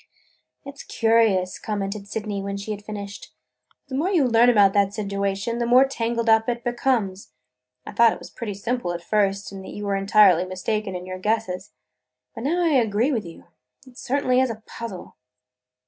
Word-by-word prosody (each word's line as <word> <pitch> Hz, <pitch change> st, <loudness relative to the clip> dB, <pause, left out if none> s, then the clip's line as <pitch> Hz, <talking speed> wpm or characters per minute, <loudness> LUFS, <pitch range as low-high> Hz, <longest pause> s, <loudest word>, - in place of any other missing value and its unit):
"It 280 Hz, 0 st, -10 dB
's -, -, -5 dB
curious," 225 Hz, -5 st, +2 dB
commented 200 Hz, -1 st, -4 dB
Sydney 205 Hz, -1 st, -4 dB
when 200 Hz, 0 st, -4 dB
she 200 Hz, +2 st, -6 dB
had 205 Hz, -1 st, -6 dB
finished, 205 Hz, -1 st, -8 dB, 0.3 s
"but -, -, -36 dB
the -, -, -8 dB
more 315 Hz, +7 st, 0 dB
you 340 Hz, -8 st, +3 dB
learn 235 Hz, 0 st, +5 dB
about 205 Hz, -5 st, +5 dB
that 200 Hz, -1 st, +2 dB
situation 200 Hz, +2 st, -2 dB
the 235 Hz, -, 0 dB
more 250 Hz, +3 st, +6 dB
tangled 235 Hz, -3 st, -2 dB
up 225 Hz, +1 st, +4 dB
it 240 Hz, -1 st, -3 dB
becomes. 240 Hz, -6 st, -1 dB, 0.5 s
I -, -, -7 dB
thought 230 Hz, +2 st, +5 dB
it -, -, -11 dB
pretty 215 Hz, -5 st, -5 dB
simple 215 Hz, -3 st, -2 dB
at 170 Hz, 0 st, -6 dB
first 200 Hz, 0 st, 0 dB
and 195 Hz, -1 st, -8 dB
that -, -, -9 dB
you 205 Hz, -, -5 dB
were 200 Hz, -1 st, 0 dB
entirely 195 Hz, -3 st, +5 dB
mistaken 190 Hz, +2 st, -3 dB
in 180 Hz, 0 st, -6 dB
your 185 Hz, 0 st, -6 dB
guesses. 210 Hz, -2 st, -2 dB, 0.6 s
But 230 Hz, -, -7 dB
now 345 Hz, +5 st, +1 dB
I -, -, +3 dB
agree 240 Hz, -2 st, +2 dB
with 225 Hz, -8 st, -1 dB
you: 165 Hz, -, -12 dB, 0.4 s
it 255 Hz, -2 st, -17 dB
certainly 255 Hz, -1 st, +1 dB
is 260 Hz, -, +1 dB
a 220 Hz, -1 st, -7 dB
puzzle!" 225 Hz, -6 st, -8 dB
215 Hz, 190 wpm, -23 LUFS, 195-240 Hz, 0.6 s, more